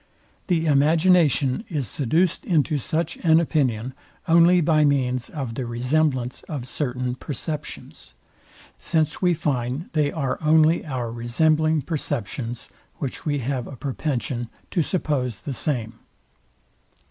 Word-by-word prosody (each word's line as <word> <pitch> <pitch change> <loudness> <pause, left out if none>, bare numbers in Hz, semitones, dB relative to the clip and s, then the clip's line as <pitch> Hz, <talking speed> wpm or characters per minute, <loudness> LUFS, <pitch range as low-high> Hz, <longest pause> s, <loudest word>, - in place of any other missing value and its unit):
The 170 -4 +1
imagination 155 - +3
is 145 - -2
seduced 155 - 0
into 155 -4 +1
such 165 +4 -2
an 160 -1 +4
opinion 130 -7 0 0.3
only 170 +2 +6
by 155 -2 +3
means 130 -4 +1
of 135 -6 -5
the 125 0 -4
resemblance 125 +1 0
of 140 -6 -4
certain 125 -2 -2
perceptions; 150 +3 -6 0.6
since 155 -2 0
we 180 -2 +3
find 135 -1 -2
they 150 -3 +2
are 135 -5 -2
only 155 +1 +4
our 125 -5 -3
resembling 155 +6 +2
perceptions, 120 - -3 0.3
which 140 +3 -5
we 145 -1 +1
have 130 -2 -2
a 140 - -8
propension 125 -3 -3 0.2
to 175 - +2
suppose 145 - -1
the 140 - -4
same. 115 -4 -3
145 Hz, 125 wpm, -23 LUFS, 125-160 Hz, 0.6 s, only